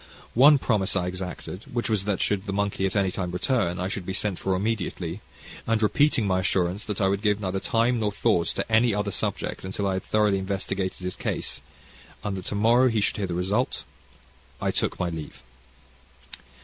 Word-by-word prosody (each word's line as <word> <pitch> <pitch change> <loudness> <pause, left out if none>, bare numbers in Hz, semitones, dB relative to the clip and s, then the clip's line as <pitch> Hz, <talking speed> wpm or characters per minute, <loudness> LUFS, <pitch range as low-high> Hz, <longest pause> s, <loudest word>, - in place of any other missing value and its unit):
One 140 +5 +7
promise 105 -8 +1
I 90 -2 +1
exacted, 90 +2 -6
which 120 -1 -1
was 105 -4 +1
that 105 -2 0
should 100 0 0
the - - -1
monkey 100 -1 0
at 95 - -5
any 100 -2 +2
time 90 -1 -3
return, 90 -1 0
I 90 - -1
should 95 0 -3
be 95 - -4
sent 100 -3 -1
for 95 -1 0
immediately; 95 -3 -2 0.5
and, 115 -1 +2
repeating 130 +1 +3
my 95 -1 +2
assurance 90 +1 0
that 105 -2 -3
I 95 - +3
would 100 +1 0
give 105 -1 +2
neither 95 -1 -2
time 115 +4 +1
nor 105 -2 0
thought 90 -3 +1
to - - -3
any 110 -1 +4
other 105 0 -1
subject - - -2
until 95 +2 -3
I 95 - +1
had 95 - -2
thoroughly 105 -2 +2
investigated 95 -1 -3
his 90 0 -3
case, - - -3 0.6
and 100 -2 -2
that 95 -1 -6
to - - -3
morrow 120 +5 +5
he 115 -2 +1
should 100 - +1
hear 100 -2 -1
the 85 - -3
result, 100 +8 0 0.8
I - - 0
took - - -1
my 90 - 0
leave. 80 -5 -7
100 Hz, 200 wpm, -26 LUFS, 95-110 Hz, 0.8 s, One